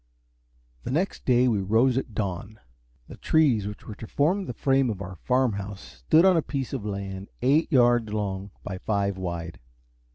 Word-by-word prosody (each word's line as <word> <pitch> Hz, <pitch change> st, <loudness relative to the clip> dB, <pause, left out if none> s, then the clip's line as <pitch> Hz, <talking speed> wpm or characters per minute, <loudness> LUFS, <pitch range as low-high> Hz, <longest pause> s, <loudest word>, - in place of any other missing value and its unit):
The -, -, -6 dB
next 170 Hz, +9 st, -1 dB
day 125 Hz, 0 st, +4 dB
we 110 Hz, -4 st, +2 dB
rose 115 Hz, +6 st, +2 dB
at 125 Hz, -5 st, -3 dB
dawn. 100 Hz, +1 st, -4 dB, 0.5 s
The -, -, -11 dB
trees 130 Hz, -11 st, +2 dB
which 105 Hz, 0 st, -8 dB
were 110 Hz, -, -7 dB
to 110 Hz, -, -9 dB
form 180 Hz, -, +1 dB
the -, -, -4 dB
frame 135 Hz, +1 st, +2 dB
of 105 Hz, -4 st, -3 dB
our 95 Hz, -2 st, -7 dB
farm 125 Hz, +3 st, +1 dB
house 100 Hz, 0 st, -6 dB, 0.3 s
stood 165 Hz, +3 st, +6 dB
on 190 Hz, -1 st, +6 dB
a 165 Hz, -, +3 dB
piece 135 Hz, -4 st, -4 dB
of -, -, -3 dB
land 100 Hz, -1 st, -5 dB
eight 150 Hz, +7 st, +3 dB
yards 120 Hz, -4 st, +4 dB
long 100 Hz, -2 st, -3 dB
by 95 Hz, -2 st, -5 dB
five 100 Hz, -1 st, -1 dB
wide. 85 Hz, -3 st, -5 dB
110 Hz, 185 wpm, -26 LUFS, 100-130 Hz, 0.5 s, stood